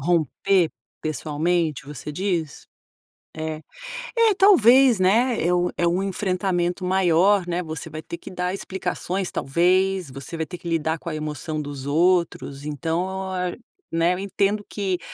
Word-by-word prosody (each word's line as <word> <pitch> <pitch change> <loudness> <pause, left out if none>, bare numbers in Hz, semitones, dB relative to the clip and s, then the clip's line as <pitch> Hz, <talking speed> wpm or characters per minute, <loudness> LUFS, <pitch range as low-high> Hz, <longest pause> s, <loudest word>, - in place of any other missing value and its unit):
Romper 175 +3 +2 0.3
pessoalmente, 155 0 -1
você 150 +1 -7
diz? 170 -3 -2 0.7
É. 155 0 -4 0.6
É 455 -2 +5
talvez, 265 - +6
né, 225 +5 +3
é 180 - +3
um 180 0 +2
é 170 - +2
um 180 +3 +1
enfrentamento 185 -2 -1
maior, 185 +1 +3
né. 175 +1 -1
Você 160 -1 -6
vai 155 0 -6
ter 170 - -7
dar 180 0 -2
explicações, 190 -1 -3
talvez. 185 +4 +1
Você 135 +5 -8
vai 160 - -1
ter 180 - -8
que 170 - -7
lidar 160 0 0
com 170 - -6
a 155 - -4
emoção 155 0 -4
dos 140 -2 -7
outros, 165 -3 +1
então 180 +6 -2
é 180 -1 -2 0.3
né, 165 +2 +2
eu 180 - -4
entendo 200 +1 0
que 190 -3 -2
175 Hz, 145 wpm, -23 LUFS, 160-190 Hz, 0.7 s, talvez